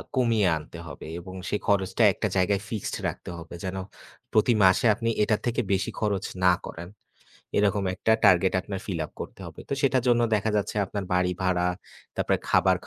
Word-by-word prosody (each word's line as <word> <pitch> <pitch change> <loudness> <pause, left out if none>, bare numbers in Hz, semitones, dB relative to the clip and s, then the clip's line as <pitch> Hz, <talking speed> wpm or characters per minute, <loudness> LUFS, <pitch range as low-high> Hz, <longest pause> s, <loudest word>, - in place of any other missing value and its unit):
কমিয়ে 115 -6 +3
আনতে 80 +2 -10
হবে 75 - -9
এবং 95 +1 -10
সে - - 0
খরচটা 95 +2 +2
একটা 105 - -2
জায়গায় 95 +2 +2
fixed 110 -4 -3
রাখতে - - -6
হবে 85 0 -10
যেন 95 0 -3 0.6
প্রতি 110 +2 +4
মাসে 95 +5 +5
আপনি 115 0 -1
এটার 105 0 +1
থেকে 120 - +1
বেশি 95 0 0
খরচ 105 -3 0 0.2
না 90 - +7
করেন। 85 +1 -7 0.7
এরকম 100 -1 +2
একটা 110 - +1
target 95 -1 +5
আপনার 95 +1 -5
fill 90 -5 -3
up - - -10
করতে - - -7
হবে। - - -10
তো - - -3
সেটার 130 -2 +3
জন্য 120 0 +4
দেখা 105 +1 +1
যাচ্ছে 105 +1 -2
আপনার 100 0 -4
বাড়ি 90 0 +2
ভাড়া, 90 -1 +1 0.5
তারপরে - - +1
খাবার - - +4
100 Hz, 180 wpm, -26 LUFS, 90-110 Hz, 0.7 s, না